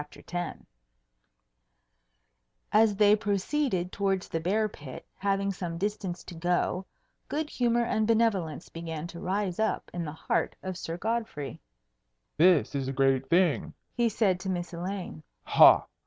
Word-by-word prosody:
X 150 Hz, -, -14 dB, 2.5 s
As 215 Hz, -1 st, +4 dB
they 210 Hz, +1 st, +6 dB
proceeded 205 Hz, -1 st, -1 dB
towards 195 Hz, -2 st, -1 dB
the 165 Hz, -, -1 dB
bear 205 Hz, +6 st, +1 dB
pit, 145 Hz, -9 st, -10 dB
having 195 Hz, 0 st, 0 dB
some 175 Hz, -3 st, -5 dB
distance 195 Hz, -2 st, -3 dB
to -, -, -10 dB
go, 175 Hz, +2 st, -1 dB, 0.4 s
good 305 Hz, +1 st, -3 dB
humour 240 Hz, -1 st, +2 dB
and 220 Hz, -2 st, 0 dB
benevolence 200 Hz, -9 st, +1 dB
began 165 Hz, -1 st, -6 dB
to 170 Hz, 0 st, -8 dB
rise 190 Hz, 0 st, -2 dB
up 220 Hz, 0 st, -1 dB
in 175 Hz, -1 st, -3 dB
the 150 Hz, -, -4 dB
heart 160 Hz, -, -1 dB
of 185 Hz, -1 st, -4 dB
Sir 170 Hz, -1 st, -5 dB
Godfrey. 220 Hz, -, -3 dB, 0.7 s
"This 170 Hz, -3 st, +4 dB
is 135 Hz, -2 st, -2 dB
a -, -, -1 dB
great 135 Hz, 0 st, +2 dB
thing!" 175 Hz, -2 st, +2 dB, 0.2 s
he 240 Hz, -1 st, +2 dB
said 195 Hz, -4 st, +1 dB
to 190 Hz, -, -4 dB
Miss 175 Hz, -1 st, -3 dB
Elaine. 180 Hz, -, -5 dB, 0.2 s
"Ha! -, -, +7 dB
185 Hz, 140 wpm, -28 LUFS, 165-210 Hz, 2.5 s, Ha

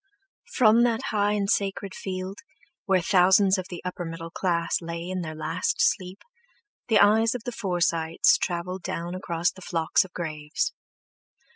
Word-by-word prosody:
From 230 Hz, -2 st, +5 dB
that 235 Hz, -1 st, +2 dB
high 205 Hz, -1 st, +1 dB
and 205 Hz, -1 st, 0 dB
sacred 195 Hz, -1 st, -1 dB
field, 185 Hz, +1 st, -5 dB, 0.5 s
where 190 Hz, -3 st, +2 dB
thousands 190 Hz, +1 st, +4 dB
of 185 Hz, -, -6 dB
the 175 Hz, -, -8 dB
upper 180 Hz, 0 st, -4 dB
middle 165 Hz, 0 st, -7 dB
class 170 Hz, -2 st, 0 dB
lay 170 Hz, +1 st, -5 dB
in 185 Hz, 0 st, -3 dB
their 155 Hz, -2 st, -6 dB
last 160 Hz, +3 st, -1 dB
sleep, 185 Hz, +1 st, 0 dB, 0.6 s
the 220 Hz, -3 st, +4 dB
eyes 220 Hz, +3 st, +4 dB
of 240 Hz, -, -5 dB
the 245 Hz, -, -4 dB
Forsytes 170 Hz, -6 st, +1 dB
travelled 180 Hz, +1 st, -3 dB
down 170 Hz, +1 st, -4 dB
across 175 Hz, -2 st, -1 dB
the 190 Hz, -, -15 dB
flocks 165 Hz, -3 st, +1 dB
of 190 Hz, -, -13 dB
graves. 155 Hz, -, -3 dB
185 Hz, 155 wpm, -26 LUFS, 170-200 Hz, 0.6 s, From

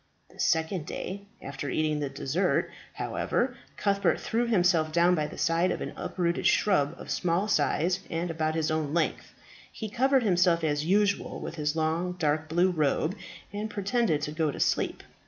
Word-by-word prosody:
The -, -, -19 dB
second 160 Hz, 0 st, +1 dB
day 200 Hz, +2 st, -5 dB, 0.2 s
after 140 Hz, 0 st, -5 dB
entering 155 Hz, +2 st, 0 dB
the 145 Hz, -2 st, -2 dB
desert, 155 Hz, +8 st, 0 dB, 0.2 s
however, -, -, -1 dB, 0.2 s
Cuthbert 200 Hz, -2 st, +1 dB
threw 235 Hz, +2 st, -1 dB
himself 175 Hz, -7 st, +3 dB
down 170 Hz, +2 st, +4 dB
by 155 Hz, -4 st, 0 dB
the -, -, -10 dB
side 170 Hz, +1 st, +2 dB
of -, -, -2 dB
an -, -, -5 dB
uprooted 170 Hz, -2 st, -1 dB
shrub 170 Hz, -6 st, +2 dB
of -, -, -8 dB
small 180 Hz, +4 st, +1 dB
size 170 Hz, +1 st, +1 dB
and 165 Hz, +1 st, -2 dB
about 160 Hz, -1 st, -1 dB
his 155 Hz, -1 st, 0 dB
own 155 Hz, -1 st, -1 dB
length. 165 Hz, -2 st, -1 dB, 0.4 s
He 220 Hz, -, -6 dB
covered 260 Hz, +3 st, +3 dB
himself 175 Hz, -4 st, +3 dB
as 150 Hz, -1 st, +1 dB
usual 200 Hz, +3 st, +1 dB
with -, -, -6 dB
his 150 Hz, -1 st, -1 dB
long, 165 Hz, +3 st, 0 dB
dark 155 Hz, -2 st, -1 dB
blue 175 Hz, +3 st, +3 dB
robe, 155 Hz, +2 st, +1 dB, 0.4 s
and 210 Hz, +2 st, -3 dB
pretended 205 Hz, -6 st, 0 dB
to 150 Hz, -, -2 dB
go 155 Hz, 0 st, 0 dB
to -, -, -5 dB
sleep. -, -, 0 dB
170 Hz, 175 wpm, -28 LUFS, 155-195 Hz, 0.4 s, down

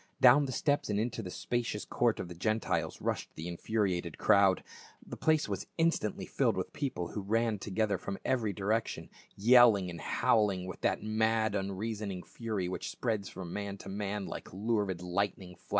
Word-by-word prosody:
Down 135 Hz, +3 st, +7 dB
the 130 Hz, -, -4 dB
steps 145 Hz, 0 st, 0 dB
and 105 Hz, 0 st, +1 dB
into 115 Hz, +1 st, -2 dB
the 95 Hz, -, -6 dB
spacious 115 Hz, +1 st, -2 dB
court 120 Hz, -2 st, +1 dB
of -, -, -4 dB
the 85 Hz, -, -8 dB
Gentiles 110 Hz, +6 st, -1 dB
rushed -, -, -2 dB
the 80 Hz, +2 st, -6 dB
infuriated 90 Hz, -2 st, -1 dB
crowd; 100 Hz, -2 st, +4 dB, 0.4 s
the -, -, -7 dB
place 155 Hz, -1 st, +2 dB
was -, -, -4 dB
instantly 165 Hz, -, +1 dB
filled -, -, +1 dB
with -, -, -3 dB
people, 120 Hz, -, -3 dB
who 105 Hz, -, -4 dB
ran 110 Hz, +1 st, +1 dB
together 100 Hz, -1 st, 0 dB
from 100 Hz, +2 st, -4 dB
every 115 Hz, -5 st, +1 dB
direction 105 Hz, +4 st, -2 dB, 0.2 s
yelling 110 Hz, -4 st, +6 dB
and 85 Hz, -2 st, -8 dB
howling 100 Hz, +1 st, +2 dB
with 90 Hz, -, -7 dB
that -, -, 0 dB
mad 110 Hz, 0 st, +1 dB
unreasoning 100 Hz, -1 st, -3 dB
fury 110 Hz, -6 st, -3 dB
which 90 Hz, -, -4 dB
spreads 110 Hz, -5 st, -2 dB
from 90 Hz, -3 st, -7 dB
man 100 Hz, -1 st, -4 dB
to -, -, -9 dB
man 100 Hz, 0 st, -3 dB
like -, -, -7 dB
lurid 100 Hz, -3 st, -1 dB
lightning 90 Hz, 0 st, -2 dB
fla. -, -, -28 dB
105 Hz, 175 wpm, -32 LUFS, 95-115 Hz, 0.4 s, Down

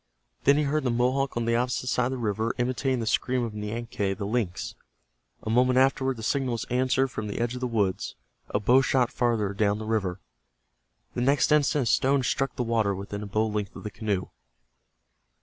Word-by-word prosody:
Then 140 Hz, +1 st, +6 dB
he 150 Hz, -, +2 dB
heard 150 Hz, +2 st, 0 dB
the 130 Hz, -, +1 dB
Mohawk 125 Hz, +3 st, +1 dB
on 120 Hz, -, 0 dB
the 115 Hz, 0 st, +2 dB
opposite 125 Hz, +1 st, 0 dB
side 125 Hz, -1 st, +1 dB
of 130 Hz, -, -3 dB
the -, -, -3 dB
river 110 Hz, 0 st, -1 dB
imitating 130 Hz, +1 st, 0 dB
the -, -, -2 dB
scream 125 Hz, +3 st, +1 dB
of 115 Hz, -2 st, -4 dB
Nianque, 105 Hz, -2 st, -3 dB
the 100 Hz, -, -3 dB
lynx. 105 Hz, -4 st, -2 dB, 0.7 s
A -, -, -4 dB
moment 125 Hz, +2 st, +3 dB
afterward 130 Hz, -1 st, +2 dB
the 110 Hz, -, -7 dB
signal 130 Hz, +1 st, 0 dB
was 115 Hz, -, -3 dB
answered 130 Hz, +1 st, +2 dB
from 110 Hz, -3 st, -5 dB
the 105 Hz, -, -4 dB
edge 120 Hz, +1 st, 0 dB
of 125 Hz, -, -6 dB
the 125 Hz, -, 0 dB
woods, 105 Hz, -6 st, -1 dB, 0.3 s
a 105 Hz, -, 0 dB
bow 125 Hz, +6 st, +5 dB
shot 130 Hz, -2 st, +2 dB
farther 115 Hz, -6 st, 0 dB
down 100 Hz, 0 st, +1 dB
the 110 Hz, -, -6 dB
river. 100 Hz, -5 st, -1 dB, 0.9 s
The 120 Hz, -, -2 dB
next 140 Hz, +4 st, +3 dB
instant 150 Hz, -1 st, +3 dB
a -, -, -3 dB
stone 135 Hz, +4 st, +2 dB
struck 135 Hz, +2 st, -1 dB
the 125 Hz, -, -1 dB
water 110 Hz, -4 st, +1 dB
within 100 Hz, +2 st, -6 dB
a 105 Hz, -, -5 dB
bow 110 Hz, +2 st, +1 dB
length 105 Hz, -2 st, -3 dB
of -, -, -9 dB
the 105 Hz, -, -5 dB
canoe. 100 Hz, -3 st, -2 dB
120 Hz, 210 wpm, -27 LUFS, 105-130 Hz, 0.9 s, Then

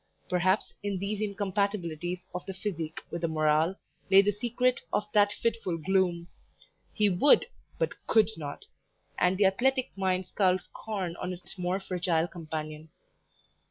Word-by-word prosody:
Perhaps, 185 Hz, +2 st, +1 dB
in 205 Hz, -2 st, -2 dB
these 200 Hz, +2 st, -2 dB
incompatibilities 190 Hz, -4 st, -2 dB
of 180 Hz, -, -4 dB
the 195 Hz, -, -5 dB
"physique" 170 Hz, -5 st, -4 dB
with 170 Hz, -, -4 dB
the 170 Hz, -, +1 dB
"morale," 155 Hz, +2 st, +2 dB, 0.3 s
lay 195 Hz, +1 st, +8 dB
the 205 Hz, -, +3 dB
secret 240 Hz, +4 st, 0 dB
of 210 Hz, -, +1 dB
that 205 Hz, -1 st, +5 dB
fitful 220 Hz, -6 st, -1 dB
gloom; 175 Hz, 0 st, +1 dB, 0.6 s
he 210 Hz, -2 st, +2 dB
WOULD 195 Hz, +9 st, +5 dB, 0.3 s
but -, -, 0 dB, 0.2 s
COULD 220 Hz, 0 st, +4 dB
not, 145 Hz, -3 st, -7 dB, 0.5 s
and 180 Hz, +1 st, +3 dB
the 200 Hz, -, +4 dB
athletic 255 Hz, +7 st, +2 dB
mind 185 Hz, -1 st, 0 dB
scowled 185 Hz, 0 st, +2 dB
scorn 190 Hz, -6 st, -5 dB
on 180 Hz, -, -3 dB
its 180 Hz, -, -8 dB
more 180 Hz, +1 st, -1 dB
fragile 175 Hz, -3 st, 0 dB
companion. 155 Hz, -2 st, -6 dB
185 Hz, 145 wpm, -29 LUFS, 170-205 Hz, 0.6 s, lay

